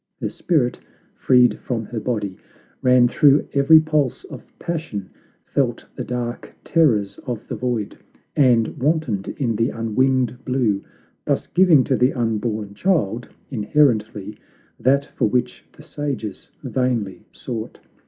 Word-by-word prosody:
Her -, -, -2 dB
spirit, 145 Hz, -9 st, 0 dB, 0.4 s
freed 125 Hz, -4 st, +4 dB
from 115 Hz, -3 st, -3 dB
her 115 Hz, +1 st, -5 dB
body, 105 Hz, -5 st, -2 dB, 0.5 s
ran 125 Hz, -1 st, +5 dB
through 140 Hz, +3 st, +4 dB
every 140 Hz, +3 st, +7 dB
pulse 155 Hz, -4 st, 0 dB
of -, -, -10 dB
passion, 155 Hz, -, -5 dB, 0.3 s
felt -, -, -1 dB
the -, -, -4 dB
dark 120 Hz, -1 st, -5 dB
terrors 115 Hz, -, +2 dB
of 120 Hz, -3 st, -4 dB
the -, -, -5 dB
Void, 120 Hz, -5 st, -2 dB, 0.4 s
and 120 Hz, -5 st, +4 dB
wantoned 135 Hz, -8 st, 0 dB
in 120 Hz, -6 st, 0 dB
the 115 Hz, +2 st, +1 dB
unwinged 125 Hz, +2 st, 0 dB
blue; 120 Hz, -7 st, 0 dB, 0.4 s
thus -, -, 0 dB
giving 175 Hz, -7 st, +5 dB
to 130 Hz, -, +1 dB
the 125 Hz, +2 st, +2 dB
unborn 110 Hz, -3 st, -2 dB
child, 120 Hz, -, 0 dB, 0.2 s
inherently, 110 Hz, -4 st, +1 dB, 0.4 s
that 140 Hz, +2 st, +2 dB
for 110 Hz, -, -1 dB
which 125 Hz, +2 st, -1 dB
the 150 Hz, -, -16 dB
sages 135 Hz, -10 st, -5 dB
vainly 115 Hz, -6 st, -2 dB
sought. 115 Hz, -4 st, -6 dB
125 Hz, 130 wpm, -21 LUFS, 110-140 Hz, 0.5 s, every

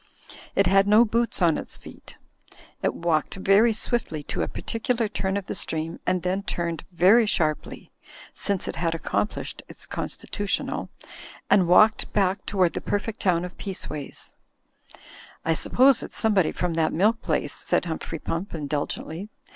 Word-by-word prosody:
It -, -, +4 dB
had 195 Hz, +1 st, +4 dB
no 215 Hz, +3 st, +6 dB
boots 230 Hz, -3 st, 0 dB
on 165 Hz, -3 st, +3 dB
its -, -, -8 dB
feet. -, -, -14 dB, 0.6 s
It -, -, 0 dB
walked 165 Hz, -3 st, 0 dB
very 195 Hz, +4 st, +4 dB
swiftly 215 Hz, -8 st, -1 dB
to -, -, -3 dB
a -, -, 0 dB
particular 230 Hz, 0 st, -2 dB
turn 190 Hz, -1 st, -2 dB
of 200 Hz, -, -4 dB
the -, -, -4 dB
stream 165 Hz, -2 st, -3 dB
and 180 Hz, -1 st, +1 dB
then 185 Hz, +2 st, 0 dB
turned 170 Hz, -5 st, -3 dB
very 195 Hz, +7 st, +5 dB
sharply 155 Hz, -6 st, -1 dB, 0.4 s
(since 200 Hz, -3 st, -1 dB
it -, -, -4 dB
had 165 Hz, -1 st, 0 dB
accomplished 205 Hz, +5 st, -3 dB
its -, -, -9 dB
constitutional), 205 Hz, -1 st, -3 dB, 0.6 s
and 185 Hz, -4 st, +5 dB
walked 215 Hz, +5 st, +5 dB
back 195 Hz, -1 st, +1 dB
toward 185 Hz, -4 st, +2 dB
the -, -, -4 dB
perfect 210 Hz, +2 st, -2 dB
town 180 Hz, -2 st, +1 dB
of 180 Hz, -, -9 dB
Peaceways. 155 Hz, -7 st, -3 dB, 1.1 s
"I 165 Hz, -, +3 dB
suppose 255 Hz, -, +4 dB
it's -, -, -6 dB
somebody 205 Hz, -7 st, +2 dB
from 180 Hz, -2 st, -2 dB
that 160 Hz, -1 st, +1 dB
milk 215 Hz, +7 st, +2 dB
place," 145 Hz, -3 st, -1 dB
said -, -, 0 dB
Humphrey 165 Hz, -1 st, -4 dB
Pump, 170 Hz, +5 st, -4 dB
indulgently. 155 Hz, +5 st, -4 dB
185 Hz, 155 wpm, -25 LUFS, 165-210 Hz, 1.1 s, no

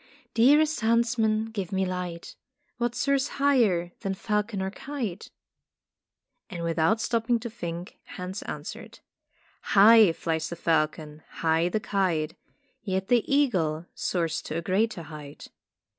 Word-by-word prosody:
"Dearest 295 Hz, +4 st, +4 dB
huntsman, 225 Hz, -1 st, +1 dB
give 200 Hz, -5 st, -4 dB
me 190 Hz, 0 st, +1 dB
light. 180 Hz, -2 st, -5 dB, 0.4 s
What 240 Hz, 0 st, -1 dB
soars 275 Hz, +1 st, +1 dB
higher 230 Hz, -12 st, +2 dB
than 195 Hz, -1 st, -3 dB
falcon 210 Hz, 0 st, -1 dB
or 190 Hz, 0 st, -2 dB
kite?" 240 Hz, -7 st, -5 dB, 1.2 s
And 175 Hz, -4 st, -6 dB
without 170 Hz, +6 st, +2 dB
stopping 230 Hz, +1 st, +1 dB
to 235 Hz, -1 st, -6 dB
think 175 Hz, -4 st, -7 dB, 0.2 s
Hans 180 Hz, +2 st, -5 dB
answered: -, -, -7 dB, 0.8 s
"High 215 Hz, -1 st, +8 dB
flies 160 Hz, -1 st, -2 dB
the 170 Hz, -, -5 dB
falcon, 155 Hz, -2 st, -1 dB, 0.2 s
high 165 Hz, +2 st, +3 dB
the 215 Hz, -, 0 dB
kite. 180 Hz, -7 st, 0 dB, 0.5 s
Yet 190 Hz, -3 st, -2 dB
the 245 Hz, +1 st, +2 dB
eagle 180 Hz, -, +1 dB
soars 165 Hz, -3 st, -1 dB
to 155 Hz, -, -5 dB
a -, -, -2 dB
greater 190 Hz, 0 st, 0 dB
height." 150 Hz, -2 st, -10 dB
190 Hz, 130 wpm, -27 LUFS, 170-230 Hz, 1.2 s, High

